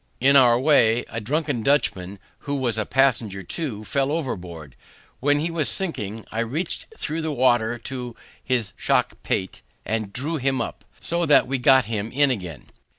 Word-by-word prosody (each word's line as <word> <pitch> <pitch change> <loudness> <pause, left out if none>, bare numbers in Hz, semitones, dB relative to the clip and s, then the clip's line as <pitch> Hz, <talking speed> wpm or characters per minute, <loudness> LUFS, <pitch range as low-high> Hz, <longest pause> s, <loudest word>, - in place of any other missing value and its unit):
In 140 +3 +4
our 120 -3 +6
way, 120 -5 +4
a 115 - -5
drunken 145 +1 -1
Dutchman, 100 -8 0 0.2
who 145 0 -4
was 125 -5 -1
a 110 - -2
passenger 120 -7 +1
too, 115 - -4
fell 135 +4 0
overboard; 90 - -5 0.4
when 145 +2 +2
he 165 +3 -1
was 160 -4 0
sinking, 115 - -2
I 110 - -3
reached 130 +10 -2
through 160 +1 -3
the 160 -1 -2
water 120 -3 +2
to 125 0 -6 0.3
his 120 -7 -1
shock - - +1
pate, 95 - -3 0.2
and 110 -2 -2
drew 145 +8 -3
him 135 -1 0
up, - - -5 0.2
so 170 0 -1
that 145 - +6
we 135 +1 -2
got 130 0 +5
him 110 0 -3
in 140 +1 +3
again. 90 - -6
125 Hz, 170 wpm, -23 LUFS, 110-145 Hz, 0.4 s, our